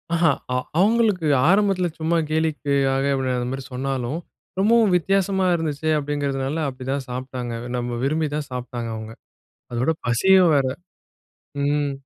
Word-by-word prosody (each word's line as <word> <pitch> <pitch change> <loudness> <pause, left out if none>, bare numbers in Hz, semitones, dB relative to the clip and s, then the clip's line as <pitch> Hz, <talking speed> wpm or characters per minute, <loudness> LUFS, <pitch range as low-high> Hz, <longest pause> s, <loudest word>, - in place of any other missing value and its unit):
அஹ. 170 - 0 0.3
அ - - +1 0.2
அவங்களுக்கு 210 -4 +3 0.2
ஆரம்பத்துல 195 -1 +3
சும்மா 160 +2 +1
கேலிக்காக 140 -4 +1 0.3
அந்த 120 0 -2
மாரி 135 0 -4
சொன்னாலும், 135 +2 -2 0.4
ரொம்பவும் 220 0 +4
வித்தியாசமா 190 +1 +1
இருந்துச்சே 155 -2 -2
அப்டிங்கறதுனால 145 +1 -2
அப்டிதான் 135 +1 -4
சாப்ட்டாங்க. 125 -1 -5 0.2
நம்ம 120 0 -3
விரும்பி 155 +2 0
தான் 150 -1 -3
சாப்ட்டாங்க 125 -2 -5
அவங்க. 110 0 -7 0.6
அதோட 125 +6 +1 0.2
பசியும் 185 +8 +5
வேற. 140 -2 +3 1.0
ம். 145 0 +1
145 Hz, 120 wpm, -23 LUFS, 130-175 Hz, 1.0 s, பசியும்